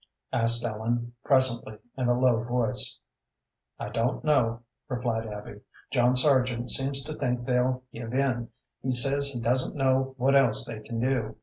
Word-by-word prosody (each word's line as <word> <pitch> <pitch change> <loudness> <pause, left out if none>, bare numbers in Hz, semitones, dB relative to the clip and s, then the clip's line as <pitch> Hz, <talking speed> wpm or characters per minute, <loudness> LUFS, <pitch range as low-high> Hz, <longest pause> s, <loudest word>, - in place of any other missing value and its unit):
asked 115 0 +3
Ellen, 120 +2 -3
presently, 130 -5 +1 0.2
in 130 -2 -1
a 120 0 +2
low 125 -3 +3
voice. 120 -1 +1 0.8
"I - - -5
don't 115 +3 -1
know," 120 -6 +1 0.3
replied 120 -3 -2
Abby. 105 -1 -9 0.3
"John 125 -1 +3
Sargent 125 -3 +2
seems 135 0 +1
to 155 +3 -6
think 125 -4 -2
they'll 125 0 0
give 115 0 -7
in. 125 -3 -1 0.3
He 130 0 -1
says 140 +3 +2
he 135 -4 -5
doesn't 125 +3 +1
know 135 -1 +1
what 135 +2 +2
else 120 -5 +5
they 115 -3 -6
can 115 +1 -6
do. 115 -3 -1
125 Hz, 160 wpm, -27 LUFS, 115-130 Hz, 0.8 s, else